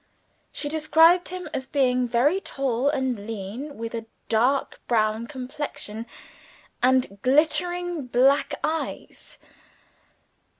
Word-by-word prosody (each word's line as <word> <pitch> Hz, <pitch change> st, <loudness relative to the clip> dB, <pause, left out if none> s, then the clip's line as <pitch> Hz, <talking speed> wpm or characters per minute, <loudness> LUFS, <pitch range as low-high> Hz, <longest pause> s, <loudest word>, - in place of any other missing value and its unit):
She 290 Hz, -, -4 dB
described 320 Hz, +3 st, +4 dB
him 365 Hz, -1 st, -6 dB
as 260 Hz, -3 st, -3 dB
being 255 Hz, -3 st, +2 dB
very 280 Hz, +11 st, +2 dB
tall 270 Hz, -3 st, -1 dB
and 255 Hz, -7 st, -2 dB
lean, 225 Hz, +7 st, -6 dB
with 230 Hz, +1 st, -5 dB
a 225 Hz, -1 st, -5 dB, 0.2 s
dark 250 Hz, +5 st, +1 dB
brown 220 Hz, 0 st, +1 dB
complexion 255 Hz, -4 st, -6 dB, 0.7 s
and 250 Hz, -6 st, +2 dB
glittering 335 Hz, +3 st, +1 dB
black 265 Hz, +4 st, +3 dB
eyes. 320 Hz, +1 st, -4 dB
260 Hz, 100 wpm, -25 LUFS, 235-305 Hz, 0.7 s, described